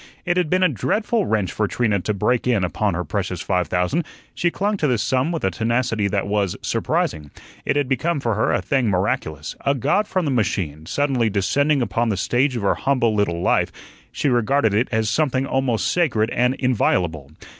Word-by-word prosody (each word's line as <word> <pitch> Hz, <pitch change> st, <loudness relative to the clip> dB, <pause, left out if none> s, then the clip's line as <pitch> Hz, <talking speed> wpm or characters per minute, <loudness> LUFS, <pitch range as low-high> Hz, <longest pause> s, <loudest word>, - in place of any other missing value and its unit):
It 175 Hz, -1 st, +1 dB
had 180 Hz, -4 st, +1 dB
been 185 Hz, +2 st, +2 dB
a -, -, +6 dB
dreadful 195 Hz, -, 0 dB
wrench 105 Hz, -5 st, 0 dB
for 105 Hz, -, -1 dB
Trina 105 Hz, -2 st, 0 dB
to 105 Hz, +4 st, -2 dB
break 120 Hz, +5 st, 0 dB
in 115 Hz, -6 st, +2 dB
upon 95 Hz, +1 st, 0 dB
her 90 Hz, -, -2 dB
precious 95 Hz, -2 st, -3 dB
five 90 Hz, -1 st, 0 dB
thousand. 90 Hz, -, 0 dB, 0.3 s
She 175 Hz, -, +1 dB
clung 205 Hz, +4 st, -1 dB
to 155 Hz, -, +1 dB
this 125 Hz, -5 st, +1 dB
sum 130 Hz, +5 st, +1 dB
with 165 Hz, -, -3 dB
a 95 Hz, -, +1 dB
tenacity 115 Hz, +1 st, 0 dB
that 100 Hz, 0 st, -1 dB
was 100 Hz, -2 st, -1 dB
surprising; 75 Hz, -2 st, -1 dB, 0.4 s
it -, -, +1 dB
had 145 Hz, -2 st, +1 dB
become 160 Hz, +4 st, 0 dB
for 120 Hz, -4 st, -1 dB
her 110 Hz, -, +1 dB
a -, -, 0 dB
thing 130 Hz, -6 st, +1 dB
miraculous, 85 Hz, -5 st, -2 dB
a 140 Hz, -, +2 dB
god 150 Hz, -, +1 dB
from 185 Hz, -4 st, -1 dB
the 145 Hz, -, 0 dB
machine, 90 Hz, -, -1 dB
suddenly 135 Hz, -6 st, +1 dB
descending 140 Hz, +8 st, +1 dB
upon 115 Hz, +2 st, 0 dB
the 100 Hz, -, -1 dB
stage 125 Hz, +7 st, +1 dB
of 115 Hz, -, -3 dB
her 100 Hz, -, +3 dB
humble 125 Hz, -5 st, +1 dB
little 90 Hz, -5 st, 0 dB
life; -, -, +2 dB, 0.4 s
she -, -, -1 dB
regarded 120 Hz, -2 st, +2 dB
it 110 Hz, +5 st, +2 dB
as 110 Hz, -1 st, +1 dB
something 135 Hz, +2 st, +1 dB
almost 125 Hz, -8 st, 0 dB
sacred 115 Hz, -11 st, +1 dB
and 125 Hz, +2 st, +1 dB
inviolable. 90 Hz, -, 0 dB
115 Hz, 200 wpm, -21 LUFS, 100-140 Hz, 0.4 s, a